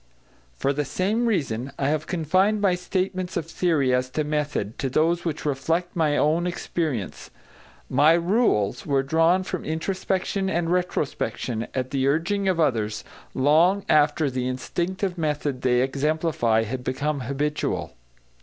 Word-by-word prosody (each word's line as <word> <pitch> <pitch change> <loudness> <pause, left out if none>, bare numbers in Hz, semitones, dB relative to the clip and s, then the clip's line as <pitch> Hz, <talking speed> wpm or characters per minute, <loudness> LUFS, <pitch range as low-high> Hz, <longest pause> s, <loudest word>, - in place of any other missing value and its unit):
For 140 - +1
the 150 +1 -1
same 205 - 0
reason, 140 - -1
I 135 - 0
have 155 0 -1
confined 185 +5 +2
my 200 -3 +3
statements 185 0 -2
of 170 - -2
theory 160 -6 +1
as 125 0 +1
to 155 +4 -1
method, 150 -8 -2
to 135 - -1
those 165 +6 +1
which 160 -3 -3
reflect 160 +5 -1
my 155 -3 +2
own 165 +4 +2
experience; 155 - -3 0.6
my 145 +5 +5
"rules" 170 - +1
were 140 -2 +1
drawn 165 +6 +3
from 185 -1 -4
introspection 190 +3 -2
and 170 -2 0
retrospection, 140 -9 -2
at 130 -1 -2
the 135 -1 +1
urging 180 +7 +1
of 185 -3 +1
others, 110 -9 0 0.3
long 165 +9 +3
after 150 0 +3
the 125 0 -2
instinctive 175 +8 -3
method 145 -4 -1
they 125 -1 +3
exemplify 135 -4 +1
had 125 +3 -5
become 140 +3 -1
habitual. 140 +4 -2
155 Hz, 145 wpm, -24 LUFS, 135-180 Hz, 0.6 s, my